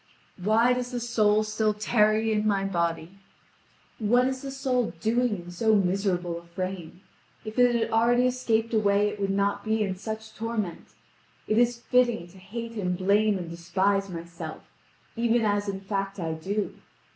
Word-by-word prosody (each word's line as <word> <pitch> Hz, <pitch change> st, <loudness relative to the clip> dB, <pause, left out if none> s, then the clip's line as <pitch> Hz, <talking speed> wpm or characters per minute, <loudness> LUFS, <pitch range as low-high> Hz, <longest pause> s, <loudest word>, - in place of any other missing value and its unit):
Why 225 Hz, +5 st, +4 dB
does 250 Hz, 0 st, -2 dB
the 245 Hz, -1 st, -3 dB
soul 215 Hz, -3 st, +2 dB
still 215 Hz, 0 st, 0 dB
tarry 215 Hz, +1 st, +2 dB
in 215 Hz, 0 st, +1 dB
my 200 Hz, -2 st, +1 dB
body? 170 Hz, 0 st, -2 dB, 0.8 s
What 245 Hz, +4 st, +3 dB
is 260 Hz, 0 st, -3 dB
the 275 Hz, -, -5 dB
soul 265 Hz, -3 st, -1 dB
doing 235 Hz, 0 st, +1 dB
in 175 Hz, 0 st, -9 dB
so 220 Hz, +5 st, +2 dB
miserable 180 Hz, -3 st, 0 dB
a -, -, -17 dB
frame? 180 Hz, 0 st, -6 dB, 0.4 s
If 215 Hz, +3 st, -4 dB
it 245 Hz, -1 st, +5 dB
had 230 Hz, -1 st, 0 dB
already 240 Hz, +2 st, +3 dB
escaped 230 Hz, -3 st, 0 dB
away 205 Hz, -1 st, +3 dB
it 210 Hz, 0 st, -7 dB
would 195 Hz, -1 st, 0 dB
not 200 Hz, +1 st, 0 dB
be 220 Hz, 0 st, +1 dB
in 190 Hz, -2 st, -2 dB
such 220 Hz, +2 st, -6 dB
torment. 220 Hz, -6 st, -4 dB, 0.5 s
It 215 Hz, +1 st, +2 dB
is 240 Hz, 0 st, +3 dB
fitting 240 Hz, -6 st, +1 dB
to 190 Hz, +2 st, -16 dB
hate 230 Hz, +5 st, -6 dB
and 180 Hz, -3 st, -1 dB
blame 200 Hz, +2 st, +3 dB
and 175 Hz, -2 st, -5 dB
despise 190 Hz, +4 st, 0 dB
myself, 170 Hz, -1 st, -7 dB, 0.5 s
even 235 Hz, 0 st, +2 dB
as 205 Hz, -1 st, 0 dB
in 195 Hz, -1 st, -4 dB
fact 195 Hz, 0 st, -3 dB
I 165 Hz, -2 st, -2 dB
do. 195 Hz, +6 st, -3 dB
210 Hz, 170 wpm, -27 LUFS, 190-230 Hz, 0.8 s, it